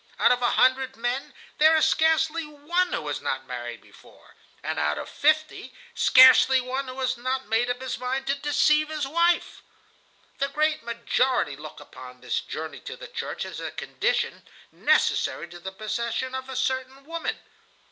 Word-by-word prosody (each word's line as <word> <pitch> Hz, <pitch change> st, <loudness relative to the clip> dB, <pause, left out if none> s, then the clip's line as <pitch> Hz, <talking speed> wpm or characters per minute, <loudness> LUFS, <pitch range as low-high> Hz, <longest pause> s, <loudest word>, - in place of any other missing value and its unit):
Out -, -, +4 dB
of 250 Hz, 0 st, +1 dB
a 240 Hz, -, +3 dB
hundred 260 Hz, +1 st, +2 dB
men, 240 Hz, +3 st, -3 dB, 0.3 s
there 315 Hz, +1 st, +6 dB
is 315 Hz, -, +4 dB
scarcely 320 Hz, +1 st, +2 dB
one 310 Hz, +5 st, -1 dB
who 150 Hz, -, -3 dB
has 145 Hz, -, -3 dB
not 130 Hz, 0 st, -3 dB
married 120 Hz, -2 st, -6 dB
before, -, -, -19 dB, 0.3 s
and -, -, -2 dB
out 75 Hz, 0 st, 0 dB
of -, -, -5 dB
fifty 310 Hz, +1 st, 0 dB, 0.2 s
scarcely 260 Hz, -, +7 dB
one 260 Hz, +2 st, -3 dB
who 255 Hz, +1 st, -7 dB
has 255 Hz, -1 st, 0 dB
not 260 Hz, +2 st, -2 dB
made 230 Hz, +2 st, +1 dB
up 245 Hz, 0 st, -2 dB
his 260 Hz, -2 st, -4 dB
mind 260 Hz, +2 st, -2 dB
to 275 Hz, -, +1 dB
deceive 300 Hz, +2 st, +2 dB
his 305 Hz, -2 st, -2 dB
wife. 340 Hz, +3 st, +1 dB, 0.8 s
"The 275 Hz, -, +1 dB
great 310 Hz, +2 st, 0 dB
majority 235 Hz, -, 0 dB
look 150 Hz, +2 st, -10 dB
upon 125 Hz, 0 st, -12 dB
this -, -, -1 dB
journey -, -, -7 dB
to -, -, -8 dB
the -, -, -9 dB
church -, -, -5 dB
as -, -, -7 dB
a -, -, -4 dB
condition -, -, -2 dB, 0.2 s
necessary 165 Hz, -, +1 dB
to 175 Hz, 0 st, -11 dB
the 190 Hz, +2 st, -7 dB
possession 235 Hz, +5 st, -3 dB
of 260 Hz, 0 st, -5 dB
a 265 Hz, -, -6 dB
certain 260 Hz, +1 st, -2 dB
woman. 330 Hz, +1 st, -3 dB
260 Hz, 175 wpm, -25 LUFS, 235-300 Hz, 0.8 s, scarcely